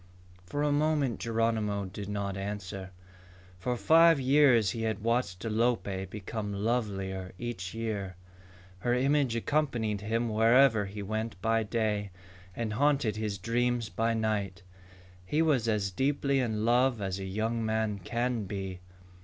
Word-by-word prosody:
For 145 +7 -2
a 150 - +2
moment 145 -4 +1
Geronimo 110 -3 0
did 100 +1 -7
not 100 -1 -2
answer. 95 -1 -5 0.7
For 125 +6 -1
five 165 +2 +6
years 130 -6 +4
he 115 - -4
had 110 -2 -2
watched 115 -5 0
Alope 110 -4 0
become 105 +1 -5
lovelier 100 -4 -2
each 110 -5 -5
year. 105 -5 -3 0.6
Her 120 +5 +1
image 135 -1 +2
accompanied 115 -6 0
him 115 +3 -1
wherever 115 0 +4
he 100 +1 -6
went 110 0 -3
by 115 +2 +2
day 105 -2 -1 0.5
and 115 -2 -2
haunted 135 -3 +2
his 105 -2 -2
dreams 120 +3 0
by 115 0 0
night. 100 -3 -2 0.6
He 150 - +1
was 135 -8 +2
as 105 -3 0
deeply 140 +5 +1
in 110 -4 -1
love 120 0 +3
as 95 -1 -3
a 95 - -5
young 110 +4 -1
man 110 -2 -1
can 115 +3 -2
be. 95 -2 -5
110 Hz, 140 wpm, -30 LUFS, 100-120 Hz, 0.7 s, five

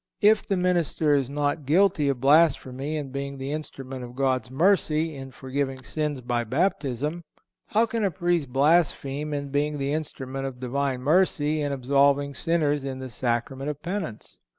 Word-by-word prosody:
If 215 0 +4
the 195 - +1
minister 175 -4 +2
is 135 -3 +1
not 145 0 -1
guilty 170 -2 +3
of 135 -3 -1
blasphemy 140 0 +3
in 140 -3 -5
being 140 0 -4
the 135 +1 -4
instrument 135 -4 -6
of 120 0 -9
God's 130 -2 0
mercy, 160 0 +2
in 135 -1 -8
forgiving 130 +1 -4
sins 150 -1 -3
by 120 -1 -1
Baptism, 145 - -1 0.4
how 220 +2 +3
can 230 -1 -2
a 200 - +3
Priest 175 -6 -1
blaspheme 150 0 +2
in 140 -1 -3
being 145 +1 0
the 140 0 -1
instrument 135 -3 -4
of 125 -2 -8
Divine 130 0 -1
mercy, 155 0 +2
in 145 -1 -1
absolving 140 +1 +2
sinners 150 -2 0
in 135 -1 -4
the 130 -1 -7
Sacrament 125 +4 -2
of 150 -1 -4
Penance? 175 - -5
140 Hz, 165 wpm, -26 LUFS, 135-155 Hz, 0.4 s, If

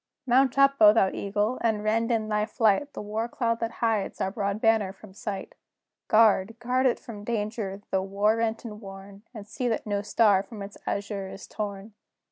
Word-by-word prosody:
Mount 260 +1 +3
up, 275 0 +5
O 210 -1 +9
thou 195 -4 +3
Eagle! 205 +4 -1
and 220 -2 0
rend, 225 +2 +1
in 220 -2 0
thy 210 0 +1
flight, 225 +5 +2
The - - -6
war 215 +2 -2
cloud 230 -1 -1
that 230 0 -3
hides 220 -3 -1
our 190 - -1
broad 200 -1 -2
banner 220 -4 +2
from 195 -1 -15
sight! 200 -1 -6 0.5
Guard, 215 -1 +4
guard 255 +2 +1
it 245 - +1
from 210 -3 -9
danger, 210 -2 -3
though 190 - +2
war 200 +3 +1
rent 225 +1 -1
and 210 -1 -8
worn, 195 0 -11
And 210 -4 -10
see 250 +3 -3
that 225 - -1
no 205 -1 -1
star 205 -1 +3
from 205 +1 -9
its 200 +1 -9
azure 200 -1 -3
is 195 - -9
torn! 205 0 -6
215 Hz, 195 wpm, -27 LUFS, 200-230 Hz, 0.5 s, O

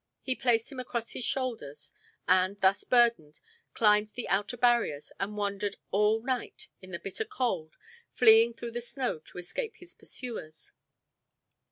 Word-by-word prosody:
He 260 - +1
placed 240 -1 +1
him 265 - -7
across 235 -2 -4
his - - -4
shoulders, 150 - -3 0.4
and, 185 +2 +3
thus 195 +1 +3
burdened, 235 -12 +3 0.4
climbed 210 -1 +4
the 245 - -4
outer 205 +5 0
barriers 235 -12 +2
and 205 +2 -3
wandered 200 0 -2 0.2
all 210 +2 +2
night 255 -2 -4
in 185 - -12
the 175 - -4
bitter 195 - -4
cold, 240 - -2 0.3
fleeing 230 0 +6
through 235 0 -6
the 240 +1 -4
snow 245 - -3
to 155 - -15
escape 435 - -5
his 355 -4 -16
pursuers. 225 -11 -7
225 Hz, 150 wpm, -29 LUFS, 190-245 Hz, 0.4 s, fleeing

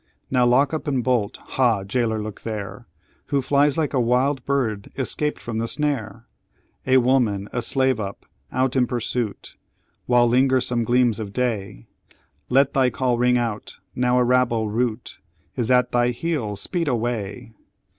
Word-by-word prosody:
Now 125 -2 +3
lock 135 +5 +3
up 155 - -3
and 135 -4 0
bolt! 120 -4 0
Ha, 115 -6 0
jailor, 110 +2 -1
look 105 -1 -7
there! 105 -3 -6 0.4
Who 140 - +1
flies 140 +2 +2
like 155 -3 0
a 135 - +2
wild 125 +3 +1
bird 115 -8 -1
escaped 150 +3 -1
from 115 -1 -4
the 115 - -1
snare? 115 -7 -2 0.6
A 130 0 +5
woman, 120 -6 +2
a 120 - -1
slave 130 -1 +1
up, 100 -1 -6 0.3
out 130 +1 0
in 125 -2 +3
pursuit. 120 -2 -4 0.5
While 120 -1 +4
linger 130 +2 +3
some 120 -1 -1
gleams 120 -1 +2
of 100 -2 -6
day! 105 - -2 0.6
Let 135 +2 +3
thy 130 -2 +3
call 125 0 -1
ring 125 0 +3
out! 115 -3 -4 0.2
now 125 0 +1
a 125 - +4
rabble 120 -3 +2
rout 115 0 -2 0.4
Is 120 -2 -1
at 125 -1 +3
thy 120 0 +2
heels 125 -5 -2
speed 175 -4 -2
away! 115 -2 -3
125 Hz, 160 wpm, -23 LUFS, 115-130 Hz, 0.6 s, A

